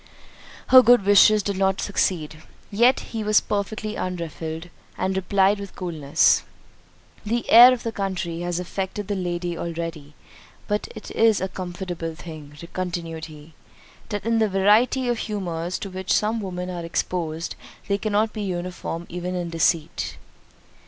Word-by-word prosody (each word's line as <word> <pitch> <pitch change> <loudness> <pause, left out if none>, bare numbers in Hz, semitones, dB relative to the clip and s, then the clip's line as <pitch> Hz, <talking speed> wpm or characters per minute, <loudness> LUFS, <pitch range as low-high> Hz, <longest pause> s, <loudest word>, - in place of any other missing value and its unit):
Her 255 0 +10
good 245 -4 +5
wishes 205 +1 +6
did 200 -1 -2
not 195 0 +1
succeed—yet 195 - 0
he 225 -2 -5
was 210 0 +4
perfectly 215 +1 -3
unruffled, 165 -2 -5 0.3
and 190 0 -1
replied 195 +2 +2
with 200 -1 -8
coolness, 155 -6 +2 0.8
"The 230 +3 -2
air 240 +3 +10
of 250 -2 -2
the 230 - -2
country 190 -5 -3
has 175 0 -2
affected 190 +2 -4
the 205 - -1
lady 175 -2 -3
already—but 165 +4 -6
it 220 - -9
is 225 -2 +3
a 190 - -1
comfortable 175 -3 -5
thing," 155 -4 -10 0.2
continued 170 -3 -4
he, 155 0 -13 0.6
"that 205 0 -4
in 230 0 +2
the 220 -1 +2
variety 210 +7 +3
of 240 -2 0
humours 180 -4 -3
to 200 - -6
which 185 0 -4
some 220 +2 +1
women 180 -2 -5
are 175 -1 -5
exposed, 165 -1 -3 0.3
they 200 0 0
cannot 215 +1 0
be 215 - -5
uniform 175 -2 -4
even 180 +1 -4
in 175 -2 -3
deceit." 165 -1 0
185 Hz, 145 wpm, -23 LUFS, 170-210 Hz, 0.8 s, Her